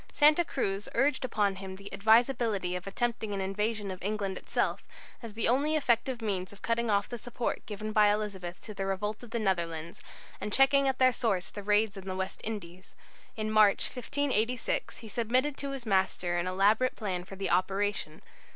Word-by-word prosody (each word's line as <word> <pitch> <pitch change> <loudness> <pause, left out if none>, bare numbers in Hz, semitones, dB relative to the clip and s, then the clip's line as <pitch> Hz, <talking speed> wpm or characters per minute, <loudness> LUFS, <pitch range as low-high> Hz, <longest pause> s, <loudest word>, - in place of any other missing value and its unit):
Santa 300 +3 +5
Cruz 200 -10 -2
urged 270 +2 +2
upon 205 -6 0
him 190 -1 -7
the 200 +1 -10
advisability 220 -3 +3
of 180 +1 -5
attempting 220 0 -2
an - - -3
invasion 205 +1 -1
of 185 - -8
England 200 -1 -2
itself, - - -1 0.4
as 225 -3 -9
the 225 - +1
only 285 +6 +2
effective 245 -3 +1
means 190 -3 -2
of 200 - -16
cutting 230 0 0
off 200 -1 +2
the 240 - -6
support 240 +1 -3
given 215 0 -5
by 210 -1 +5
Elizabeth 195 -4 -3
to 215 - -8
the 195 -1 -3
revolt 210 +3 -2
of 240 - -10
the 235 - -2
Netherlands, 170 -6 -2 0.4
and 210 - -3
checking 275 +3 +5
at 265 -1 +1
their 255 -1 +5
source 195 -7 0
the 205 - -6
raids 210 0 +2
on 190 - -12
the 185 -1 -3
West 190 +1 -4
Indies. 185 -4 -6 0.4
In 215 0 -2
March, 215 -2 +4
1586, 250 -2 -1
he 225 - -10
submitted 250 +6 +1
to 280 - -4
his 270 -3 -6
master 190 -3 +1
an 175 - -2
elaborate 205 +7 +3
plan 185 -5 -3
for 195 +2 -10
the 195 0 -2
operation. 195 -4 0
210 Hz, 190 wpm, -30 LUFS, 195-235 Hz, 0.4 s, Santa